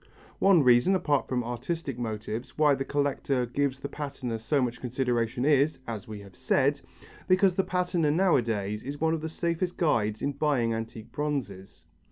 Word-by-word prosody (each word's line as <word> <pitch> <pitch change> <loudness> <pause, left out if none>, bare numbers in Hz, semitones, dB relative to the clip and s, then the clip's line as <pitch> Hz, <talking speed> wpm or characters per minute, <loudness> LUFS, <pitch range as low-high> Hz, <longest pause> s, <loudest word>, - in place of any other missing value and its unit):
One 190 -6 +5
reason, 125 +9 +5
apart 150 -6 +1
from 125 -2 -1
artistic 125 +3 -4
motives, 110 +1 -5
why 150 -2 +5
the 135 0 -1
collector 140 -2 0
gives 135 +2 -1
the 140 - -3
patina 140 -5 -5
so 140 +6 0
much 125 -2 -2
consideration 125 -1 -1
is, 145 +1 +3
as 110 -4 -5
we 105 -2 -7
have 100 -2 -14
said, 135 +2 +1 0.5
because 185 0 +4
the 190 - +1
patina 180 -4 0
nowadays 115 - +1
is 140 +2 -6
one 160 0 +2
of 160 - -2
the 160 - -4
safest 170 +2 -2
guides 110 -10 +1
in 140 - +1
buying 135 -6 +1
antique 115 0 -6
bronzes. 105 - -4
135 Hz, 170 wpm, -28 LUFS, 115-150 Hz, 0.5 s, One